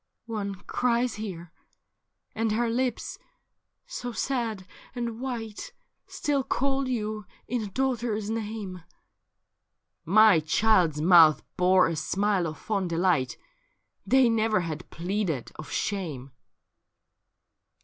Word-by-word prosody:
'' - - -55
' - - -56
One 210 -4 -4
cries 245 0 +1
here, 180 -6 -7 0.8
and 225 -1 0
her 230 +1 +1
lips, 250 0 -2 0.7
so 245 - -5
sad 225 -7 -2 0.3
and 235 -2 -3
white. 245 - -5 0.3
Still 290 -4 -1
call 270 +1 0
you 215 -4 -3 0.2
in 245 0 -1
a 210 - -4
daughter's 235 -2 -1
name.' 210 -4 -4 0.7
' - - -56 0.4
My 210 0 +6
child's 165 -1 +2
mouth 165 -2 +6
bore 185 0 +4
a 165 - -2
smile 190 +3 0
of 155 - -6
fond 195 -4 -2
delight; 170 -6 +1 0.7
They 265 -1 +4
never 220 -3 +2
had 165 -1 -6
pleaded 175 - -2
of 155 - -8
shame.'' 160 -10 -3
210 Hz, 120 wpm, -27 LUFS, 180-235 Hz, 0.8 s, My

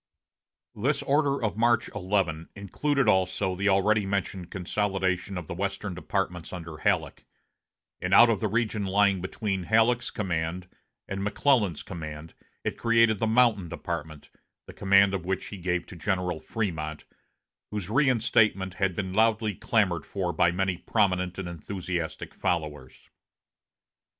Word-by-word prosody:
This 140 +7 0
order 140 -2 +1
of 105 -2 -1
March 120 0 +3
11 90 -5 -1
included 135 +7 0
also 95 -1 +2
the 100 +3 +1
already 105 +2 +3
mentioned 95 -2 -3
consolidation 95 -1 -1
of 90 - -5
the - - -6
western 100 +2 -3
departments 90 -1 -3
under 85 -3 -7
Halleck; 80 -5 0 0.8
and 90 - -2
out 120 +5 +8
of 110 - 0
the 110 - 0
region 110 -1 0
lying 100 -1 +3
between 95 0 -3
Halleck's 115 +3 +3
command 90 -2 -3 0.4
and 95 0 -4
McClellan's 105 - +1
command 80 -2 -8 0.3
it - - -3
created 115 -2 +3
the 115 - +1
Mountain 110 -6 +3
Department, 80 -4 -6 0.3
the - - -11
command 100 0 +4
of 95 -3 -2
which 95 0 -1
he 105 - -7
gave 90 -1 -1
to - - -11
General 90 0 -1
Frémont, 80 -8 -3 0.7
whose 105 -2 -4
reinstatement 110 -7 +2
had 95 -2 0
been 95 -3 -3
loudly 110 0 +2
clamored 90 -6 0
for 90 -3 -2
by 85 - +3
many 95 0 -1
prominent 90 -4 0
and 95 -2 -4
enthusiastic 85 0 -5
followers. 75 -6 -3
95 Hz, 140 wpm, -27 LUFS, 90-105 Hz, 0.8 s, out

